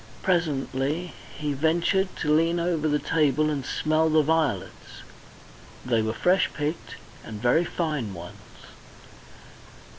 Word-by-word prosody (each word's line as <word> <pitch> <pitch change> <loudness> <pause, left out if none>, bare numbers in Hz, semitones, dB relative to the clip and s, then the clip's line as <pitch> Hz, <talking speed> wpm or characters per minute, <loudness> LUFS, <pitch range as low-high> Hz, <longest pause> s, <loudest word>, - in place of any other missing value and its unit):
Presently 155 -1 -1 0.2
he 150 -1 -2
ventured 170 +6 +1
to 150 - +2
lean 165 +2 +2
over 170 -2 0
the 150 -1 +2
table 155 -1 +1
and 140 -3 -2
smell 155 +4 +1
the 155 0 +4
violets; 160 -2 -2 0.8
they 120 -3 +2
were 110 0 -1
fresh 180 +10 +2
picked 145 -7 -4 0.3
and 110 -2 -8
very 125 +9 +3
fine 150 - -2
ones. 85 +1 -12
155 Hz, 120 wpm, -25 LUFS, 135-165 Hz, 0.8 s, the